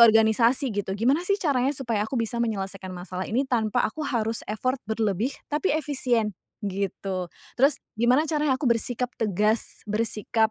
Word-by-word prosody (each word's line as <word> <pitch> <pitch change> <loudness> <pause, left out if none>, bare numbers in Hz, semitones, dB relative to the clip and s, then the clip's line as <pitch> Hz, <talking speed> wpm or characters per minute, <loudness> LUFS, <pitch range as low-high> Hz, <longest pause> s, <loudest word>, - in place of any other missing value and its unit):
organisasi 230 +3 +4
gitu. 200 -1 -2
Gimana 260 +9 +3
sih 400 +1 +3
caranya 275 -7 +1
supaya 230 -6 -1
aku 270 - -3
bisa 235 0 -1
menyelesaikan 195 -4 -2
masalah 185 +1 -5
ini 255 +5 +1
tanpa 225 -5 +1
aku 310 +8 -3
harus 225 -3 0
effort 255 +5 -1
berlebih, 220 +1 0 0.2
tapi 305 +6 +1
efisien, 255 -7 0 0.3
gitu. 195 -1 -2 0.3
Terus 275 +3 +5 0.2
gimana 250 +5 +4
caranya 300 -3 +2
aku - - -4
bersikap 245 +2 0
tegas 215 +1 0
bersikap, 220 +1 +1
230 Hz, 150 wpm, -26 LUFS, 210-260 Hz, 0.3 s, Terus